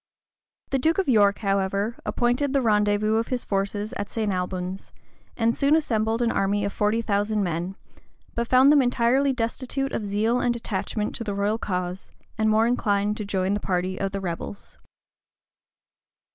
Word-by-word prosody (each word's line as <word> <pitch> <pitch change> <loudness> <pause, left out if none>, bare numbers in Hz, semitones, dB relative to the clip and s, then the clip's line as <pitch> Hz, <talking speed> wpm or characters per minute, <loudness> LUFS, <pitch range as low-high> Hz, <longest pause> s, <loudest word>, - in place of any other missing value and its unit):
The 270 - +1
duke 320 +5 +2
of 390 - 0
York, 205 -5 +4
however, 195 +3 0
appointed 250 +4 +1
the 275 - +3
rendezvous 210 0 +2
of 225 - 0
his 250 -2 -2
forces 205 +3 -2
at 205 - -4
St. 215 -3 -1
Albans, 180 +1 -4 0.4
and 230 0 +2
soon 280 +4 +3
assembled 225 -6 +1
an 230 - +2
army 200 +1 0
of 200 - -3
forty 215 +2 +1
thousand 205 0 0
men; 175 +2 -3 0.6
but 235 0 -2
found 260 +3 +6
them 295 -2 +6
entirely 250 +2 +2
destitute 260 +3 -2
of 210 - -3
zeal 220 +4 +1
and 240 -1 +1
attachment 210 -1 -3
to - - -4
the 205 -3 -3
royal 205 +3 0
cause, 180 -2 -3 0.3
and 220 0 +1
more 220 +1 +4
inclined 210 -4 +1
to 210 - -4
join 190 -1 0
the 205 - 0
party 185 -1 -2
of 195 - -1
the 195 - -3
rebels. 185 +2 -6
215 Hz, 170 wpm, -25 LUFS, 200-235 Hz, 0.6 s, found